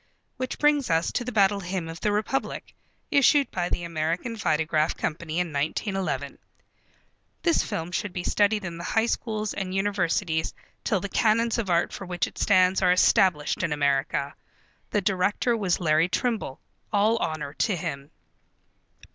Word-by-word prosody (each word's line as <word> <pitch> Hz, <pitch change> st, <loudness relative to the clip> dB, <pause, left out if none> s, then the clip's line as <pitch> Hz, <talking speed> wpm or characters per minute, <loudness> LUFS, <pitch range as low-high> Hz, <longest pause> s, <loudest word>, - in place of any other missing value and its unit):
Which 255 Hz, 0 st, -4 dB
brings 295 Hz, -4 st, +2 dB
us 165 Hz, 0 st, +1 dB
to 245 Hz, -, -1 dB
The 250 Hz, -, -4 dB
Battle 200 Hz, -2 st, +3 dB
Hymn 180 Hz, -2 st, -4 dB
of 165 Hz, +1 st, -7 dB
the 210 Hz, -, +1 dB
Republic, 215 Hz, +6 st, -2 dB, 0.4 s
issued 280 Hz, 0 st, +4 dB
by 175 Hz, -1 st, -2 dB
the 175 Hz, -, -2 dB
American 170 Hz, +8 st, -2 dB
Vitagraph 155 Hz, -4 st, 0 dB
Company 160 Hz, 0 st, -3 dB
in 175 Hz, -3 st, -2 dB
1911. 145 Hz, -, -2 dB, 1.0 s
This 335 Hz, -2 st, +3 dB
film 165 Hz, +2 st, -4 dB
should 195 Hz, +2 st, -2 dB
be 180 Hz, 0 st, -4 dB
studied 205 Hz, +1 st, +1 dB
in 170 Hz, -1 st, -6 dB
the -, -, -6 dB
High 225 Hz, +5 st, +1 dB
Schools 215 Hz, -3 st, -2 dB
and 190 Hz, -1 st, -4 dB
Universities 185 Hz, -4 st, 0 dB, 0.3 s
till 200 Hz, -5 st, 0 dB
the 200 Hz, -, -3 dB
canons 230 Hz, +2 st, +2 dB
of 210 Hz, -5 st, -2 dB
art 170 Hz, -1 st, +1 dB
for 195 Hz, -, -7 dB
which 175 Hz, -1 st, -1 dB
it -, -, -10 dB
stands 185 Hz, -1 st, +4 dB
are 180 Hz, -1 st, +4 dB
established 180 Hz, -4 st, +3 dB
in 170 Hz, -4 st, -1 dB
America. 140 Hz, -1 st, 0 dB, 0.6 s
The 210 Hz, -, +1 dB
director 200 Hz, +5 st, +1 dB
was 195 Hz, -6 st, 0 dB
Larry 160 Hz, 0 st, +2 dB
Trimble. 220 Hz, -, -2 dB, 0.3 s
All 215 Hz, +2 st, +3 dB
honor 155 Hz, -8 st, -3 dB
to 205 Hz, -, +2 dB
him. 140 Hz, -4 st, -5 dB
185 Hz, 160 wpm, -26 LUFS, 165-215 Hz, 1.0 s, issued